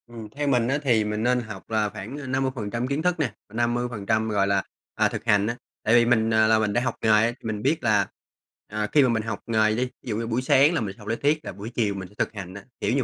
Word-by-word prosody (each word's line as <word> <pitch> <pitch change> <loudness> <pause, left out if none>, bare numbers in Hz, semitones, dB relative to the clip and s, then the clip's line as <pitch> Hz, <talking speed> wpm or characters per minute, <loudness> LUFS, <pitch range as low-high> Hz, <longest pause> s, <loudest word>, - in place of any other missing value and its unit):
Ừm, 115 -2 -9
theo 145 +6 -3
mình 125 -4 +2
á 135 +3 +1
thì 120 -5 +3
mình 105 +1 -2
nên 125 +1 +3
học 105 -5 -9
là 110 -2 +1
khoảng, 110 +6 -7
à, 145 -2 -7
50% 130 -3 -2
kiến 140 +3 -1
thức 180 0 0
nè 130 -9 0 0.2
và 105 - -14
50%, 120 -2 0
gọi 100 -2 +2
là, 100 -1 +2 0.3
à, - - +3
thực - - -5
hành 105 0 +3
á. 120 - -1 0.3
Tại 110 - +2
vì 120 -1 +6
mình, 115 -2 +3
à, 110 0 +5
là 110 0 +4
mình 105 -1 0
đã 120 - +2
học 125 -2 -1
nghề 110 - +1
á 110 +2 +5
thì 120 - -17
mình 105 -2 -3
biết 155 +7 0
là, 105 -4 +3 0.6
à, 105 0 -2
khi 145 - +5
mà 130 - +3
mình 110 -2 0
học 110 -2 -4
nghề 110 -1 +2
đi, 125 +3 0
thí 125 - -14
dụ 105 - -1
như 115 0 -3
buổi 115 +2 0
sáng 140 +4 +4
là 165 - 0
mình 100 -3 -4
học 105 - -13
lý 115 - 0
thuyết 150 +5 0
là - - -4
buổi 100 +4 -8
chiều 105 -4 +1
mình 95 -2 -6
sẽ 100 - -21
thực - - -1
hành 95 -3 -7
á, 100 0 -9 0.2
kiểu - - 0
như 135 - +2
115 Hz, 295 wpm, -25 LUFS, 105-125 Hz, 0.6 s, vì